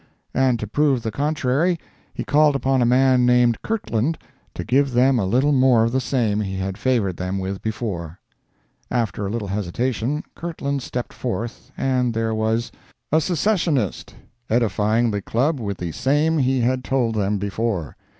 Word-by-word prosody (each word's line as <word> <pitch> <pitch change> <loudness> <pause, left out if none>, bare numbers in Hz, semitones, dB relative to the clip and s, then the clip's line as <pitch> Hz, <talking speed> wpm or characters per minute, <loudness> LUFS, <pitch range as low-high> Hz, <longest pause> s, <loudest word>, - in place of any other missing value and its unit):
And 130 -2 +2
to 110 - -3
prove 135 +2 +1
the 110 - -2
contrary, 150 - 0 0.3
he - - -5
called 150 0 +3
upon 135 -1 +1
a 120 - +3
man 130 0 +4
named 125 -2 +3
Kirtland 160 - -1 0.4
to - - -4
give 135 +3 +2
them 125 +1 +4
a 95 - 0
little 130 +8 +2
more 130 -4 +4
of 115 - +1
the 130 +1 +1
same 115 -6 0
he 95 -2 -3
had 95 0 -3
favored 105 -6 0
them 90 +1 -3
with 95 0 -4
before. 95 -7 -4 0.7
After 110 -4 -1
a - - -3
little 105 -2 -3
hesitation, 115 - -2
Kirtland 140 -5 -3
stepped 125 0 -5
forth, 120 -1 -5
and 125 -3 0
there 115 0 0
was 110 +2 0 0.4
A 155 +2 +4
SECCESSIONIST 165 - 0 0.3
edifying 110 0 +2
the 100 -1 -2
Club 135 - 0
with 100 -4 -3
the 85 -2 -4
same 150 - +1
he 130 -1 +2
had 125 +2 +1
told 125 -4 0
them 105 -1 0
before. 100 -5 -2
120 Hz, 165 wpm, -22 LUFS, 105-135 Hz, 0.7 s, man